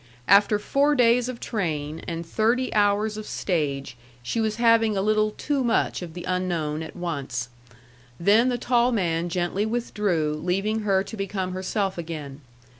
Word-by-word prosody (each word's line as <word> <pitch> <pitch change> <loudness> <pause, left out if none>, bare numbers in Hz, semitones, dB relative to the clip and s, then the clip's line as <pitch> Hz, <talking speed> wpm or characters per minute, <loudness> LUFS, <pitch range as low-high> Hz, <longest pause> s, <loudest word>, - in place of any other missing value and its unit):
After 205 +2 +5
four 280 +7 +2
days 245 -1 +3
of 245 -2 -6
train 160 -7 -3
and 170 0 -4
thirty 230 +8 +1
hours 210 +1 +2
of 215 - -7
stage, 145 -8 -2 0.3
she 225 - -1
was 220 -1 0
having 225 -2 +3
a - - +1
little 215 0 +2
too 275 +5 -2
much 235 -4 +1
of 170 -2 -8
the 175 - -6
unknown 170 -4 -1
at 160 - -8
once. 140 -8 -4 0.7
Then 215 +8 +4
the 245 - 0
tall 245 0 +2
man 175 -6 0
gently 175 +3 -1
withdrew 205 -9 -1
leaving 195 +5 0
her 195 -3 +1
to 225 - -8
become 195 -2 -3
herself 190 0 -2
again. 155 -4 -6
195 Hz, 160 wpm, -25 LUFS, 170-220 Hz, 0.7 s, After